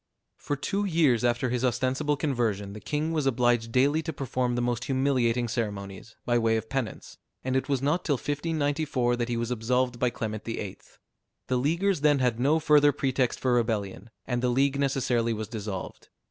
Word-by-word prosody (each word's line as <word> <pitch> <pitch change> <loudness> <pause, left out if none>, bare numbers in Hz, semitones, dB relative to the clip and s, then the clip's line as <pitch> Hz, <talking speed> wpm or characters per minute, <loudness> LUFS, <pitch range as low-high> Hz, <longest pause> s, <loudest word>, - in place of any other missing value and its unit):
For 145 - -2
two 195 +9 -2
years 160 - +2
after 120 +1 +1
his 125 0 -1
ostensible 130 +4 0
conversion, 115 -9 -1
the 105 - -8
king 150 +7 -2
was 155 -4 0
obliged 120 -2 +2
daily 140 +6 +3
to 160 0 -4
perform 130 -3 -2
the 120 - 0
most 120 0 -1
humiliating 130 -3 +1
ceremonies, 105 -2 -4
by 120 -1 +2
way 115 -1 +2
of 110 0 -5
penance; 135 -5 -4 0.2
and 130 0 -1
it 130 - 0
was 135 -2 0
not 155 +5 +1
till 145 - +1
1594 145 -3 -1
that 120 0 -2
he 120 - -1
was 115 +1 -2
absolved 125 +1 0
by 125 - +2
Clement 110 -2 -5
VIII. 105 -4 -5 0.7
The 130 - +2
Leaguers 170 +6 +1
then 145 -1 +4
had 125 -3 +1
no 145 +5 +3
further 150 -1 +5
pretext 130 -3 0
for 130 -1 +1
rebellion, 110 -3 -1 0.2
and 125 -2 -1
the 125 - +1
League 135 +2 +2
necessarily 125 -4 +1
was 110 -1 -4
dissolved. 105 -4 -6
125 Hz, 185 wpm, -27 LUFS, 115-140 Hz, 0.7 s, further